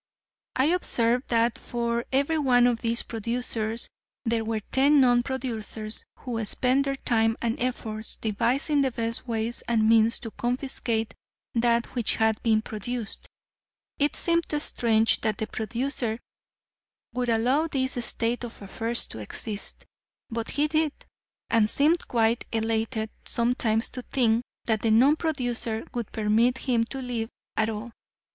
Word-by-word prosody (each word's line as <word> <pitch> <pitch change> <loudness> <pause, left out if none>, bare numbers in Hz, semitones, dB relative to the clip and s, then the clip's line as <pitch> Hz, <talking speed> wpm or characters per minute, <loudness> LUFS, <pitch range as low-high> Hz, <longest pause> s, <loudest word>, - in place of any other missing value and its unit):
I 260 - +3
observed 245 -7 +2
that 230 0 +2
for 235 0 -2
every 280 +4 +2
one 245 -4 +4
of 240 -2 +2
these 230 0 +1
producers 230 0 -2 0.4
there 230 -1 +1
were 220 -1 -2
ten 280 +7 +3
non 245 -2 +5
producers 225 -4 -4
who 230 -3 -4
spent 255 +6 +2
their 275 0 -1
time 225 -3 +1
and 230 -1 0
efforts 220 -3 -3
devising 245 +7 +1
the 270 - +2
best 230 +1 -4
ways 230 0 -1
and 225 -2 +3
means 225 0 +4
to 225 - -6
confiscate 240 -2 -2 0.4
that 235 0 +2
which 240 -4 +1
had 220 -1 +1
been 220 -2 +2
produced. 225 +1 -5 0.7
It 290 +1 +2
seemed 335 -1 +2
strange 225 -6 +2
that 215 -2 0
the 220 - -2
producer 230 +1 -2 0.9
would 245 -1 -1
allow 250 +8 +2
this 260 -4 -1
state 235 +1 0
of 235 -1 -7
affairs 225 +4 -2
to - - -8
exist; 205 - -5 0.5
but 230 0 -3
he 295 +1 +3
did, 310 -1 +1 0.5
and 225 -2 +3
seemed 315 +8 +2
quite 230 0 +2
elated 225 0 -1
sometimes 235 -2 +1
to 255 - -6
think 235 -3 +2 0.2
that 220 -2 +1
the 225 - +1
non 255 +7 +6
producer 245 -8 -2
would 235 -3 -4
permit 225 +4 +2
him 240 -4 +1
to 270 +3 -5
live 235 -3 -3 0.3
at 220 0 +1
all. 220 +2 -5
235 Hz, 145 wpm, -26 LUFS, 225-255 Hz, 0.9 s, non